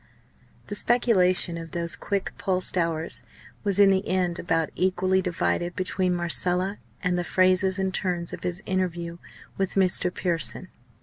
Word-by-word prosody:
The - - -6
speculation 185 -7 +3
of 165 -1 -9
those 170 -1 0
quick 200 -2 -3
pulsed 185 -1 -1
hours 165 -2 0 0.4
was 200 -2 +1
in 200 -1 +6
the 190 0 0
end 180 -2 0
about 165 -2 0
equally 185 0 +1
divided 175 0 -1
between 185 -1 0
Marcella 180 +3 0 0.2
and 180 -1 +1
the - - -1
phrases 185 +1 +2
and 190 -1 -1
turns 175 -3 -2
of - - -7
his 180 +3 -4
interview 175 -3 -2 0.4
with 195 -1 -1
Mr. 185 -1 +3
Pearson. 175 +1 -2
185 Hz, 145 wpm, -25 LUFS, 175-190 Hz, 0.4 s, in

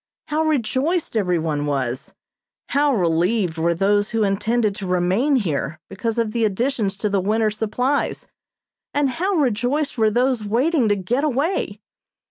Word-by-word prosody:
How 305 +1 +1
rejoiced 310 +2 0
everyone 165 -7 0
was! 130 -2 -3 0.5
How 285 -1 +2
relieved 175 0 +1
were 170 +1 +1
those 205 +3 +2
who 225 -2 0
intended 210 +2 +1
to 195 - -5
remain 185 +11 +2
here 155 - -1
because 225 +4 -3
of 230 -2 0
the 230 0 0
additions 215 -1 0
to 210 - -1
the 200 -2 +1
winter's 215 +2 0
supplies, 250 +6 -1 0.7
and 285 -2 +2
how 370 +9 -1
rejoiced 260 0 0
were 220 -1 +4
those 245 +1 +1
waiting 245 +4 +1
to 205 - +3
get 230 +9 -1
away? 300 +5 -1
220 Hz, 145 wpm, -21 LUFS, 190-265 Hz, 0.7 s, were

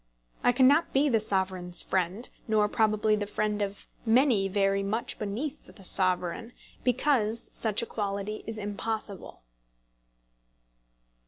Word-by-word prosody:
I 245 - +5
cannot 270 +6 +4
be 285 +2 +3
the 230 -4 +3
Sovereign's 190 -4 -1
friend, 190 +5 0 0.2
nor 215 -2 +3
probably 215 0 +2
the 205 -1 -3
friend 210 0 -1
of 200 0 -4 0.2
many 230 -3 +3
very 195 0 +1
much 210 +4 -2
beneath 240 +9 -4
the 195 - -14
Sovereign, 185 +4 +2 0.3
because 245 -3 +1
such 220 0 +1
equality 205 -1 -4
is 225 -1 -5
impossible. 205 - -5
210 Hz, 115 wpm, -28 LUFS, 195-230 Hz, 0.3 s, I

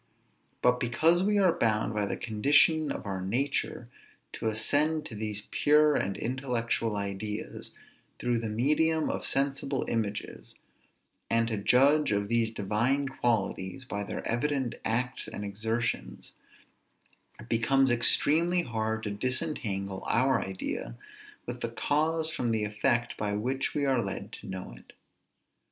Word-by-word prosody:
But 125 0 +4
because 160 +9 +3
we 205 +2 +2
are 190 -3 +5
bound, 110 -1 +1
by 105 -1 0
the - - -3
condition 145 +7 +3
of - - -5
our 95 -2 -3
nature, 120 +10 -1 0.5
to - - -3
ascend 150 +8 +1
to 120 - -7
these 105 -1 -4
pure 150 0 +4
and 95 0 -1
intellectual 115 -3 -1
ideas, 100 +2 -5 0.4
through 120 -1 0
the 115 -1 -3
medium 150 +8 +1
of - - -3
sensible 135 -1 0
images, 105 -3 -4 0.7
and 115 0 +2
to 110 - -2
judge 135 +8 +4
of 100 0 0
these 115 -1 +2
divine 115 +7 0
qualities 115 -2 -1
by 105 -5 -4
their 100 - -5
evident 130 +1 0
acts 125 +3 -1
and 105 - -6
exertions, 110 +3 -3 1.1
it 115 - -11
becomes 130 +3 +2
extremely 160 +8 +4
hard 110 -2 -2
to 105 - -3
disentangle 100 -5 -2
our 130 +2 +3
idea 95 -10 -5 0.5
of - - -5
the - - -3
cause 160 +2 0
from 125 -5 -2
the 110 -2 +1
effect 120 +3 0
by 105 -1 -1
which 130 +6 -2
we 145 -1 +1
are 130 -3 +2
led 95 -3 -5
to - - -10
know 95 -9 -6
it. - - -17
120 Hz, 140 wpm, -29 LUFS, 105-140 Hz, 1.1 s, are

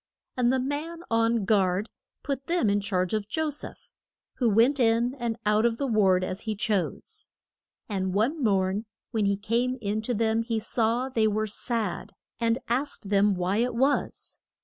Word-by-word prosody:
And 245 -1 +2
the 260 - +1
man 300 +6 -4
on 230 -1 +2
guard 195 -1 +2 0.4
put 275 -2 -3
them 335 - +2
in 205 0 +1
charge 185 -2 -1
of 215 -2 -1
Jo 315 +6 -1
seph, 290 - -8 0.5
who 240 -3 +2
went 235 +7 +4
in 235 +1 +3
and 235 -2 -2
out 210 +1 +3
of 235 -1 +2
the 280 - -1
ward 195 -6 +3
as 185 +1 -3
he 220 -2 -3
chose. 205 -2 -2 0.6
And 190 -3 -2
one 245 - 0
morn 195 0 +1 0.3
when 220 -2 0
he 200 0 +1
came 240 +5 0
in 210 0 -2
to 240 +2 -2
them 225 +1 +1
he 230 -1 -1
saw 230 +3 0
they 225 -4 +1
were 215 +1 0
sad, 215 -2 -3 0.3
and 230 0 +2
asked 240 -4 -2
them 200 0 +4
why 180 +3 0
it 240 +1 0
was. 270 +4 -1
225 Hz, 175 wpm, -27 LUFS, 205-245 Hz, 0.6 s, went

